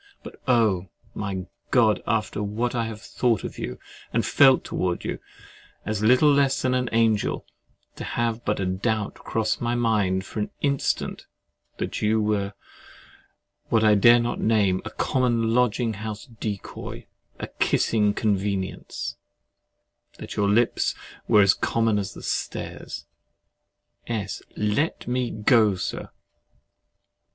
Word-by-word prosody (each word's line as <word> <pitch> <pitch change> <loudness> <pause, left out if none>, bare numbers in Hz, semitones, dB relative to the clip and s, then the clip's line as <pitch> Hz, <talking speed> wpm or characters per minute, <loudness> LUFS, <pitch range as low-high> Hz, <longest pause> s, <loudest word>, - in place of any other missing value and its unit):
But, - - -10
oh! 110 -7 +3 0.3
my 95 -3 -4 0.2
God! 115 -5 +3
after 110 -2 0
what 110 +4 -1
I 115 -2 -1
have 110 -1 -7
thought 115 -2 0
of - - -6
you 65 - -4 0.3
and - - +1
felt 135 -2 +5
towards 90 -1 -2
you, - - -3 0.7
as 105 -1 -2
little 125 +7 +5
less 140 -1 +3
than 130 0 +2
an 125 -1 0
angel, 115 -2 +1 0.5
to - - -5
have 120 0 -2
but 105 - -1
a 95 - 0
doubt 105 +3 -1
cross 110 -1 -2
my 120 0 0
mind 105 -5 +1
for - - -6
an 105 - -1
instant 140 -2 -1 0.5
that - - -3
you 110 +1 +2
were 105 -2 0 1.2
what 110 -1 +3
I 110 -1 +6
dare 120 +4 +7
not 120 +1 -2
name—a 100 -4 +2
common 120 -4 +1
lodging 120 -1 +2
house 105 0 -6
decoy, 110 -4 -6 0.3
a - - -3
kissing 105 -2 +2
convenience, 100 -2 -2 1.0
that - - -8
your 100 -1 +2
lips 115 +3 +2 0.3
were 105 - +6
as 100 0 +5
common 115 -2 +1
as 100 0 -5
the - - -10
stairs— - - -4 1.0
S. 105 -4 -3 0.2
Let 105 +11 0
me 125 0 0
go, 110 -2 +3
Sir! 90 - -4
110 Hz, 135 wpm, -25 LUFS, 105-120 Hz, 1.2 s, dare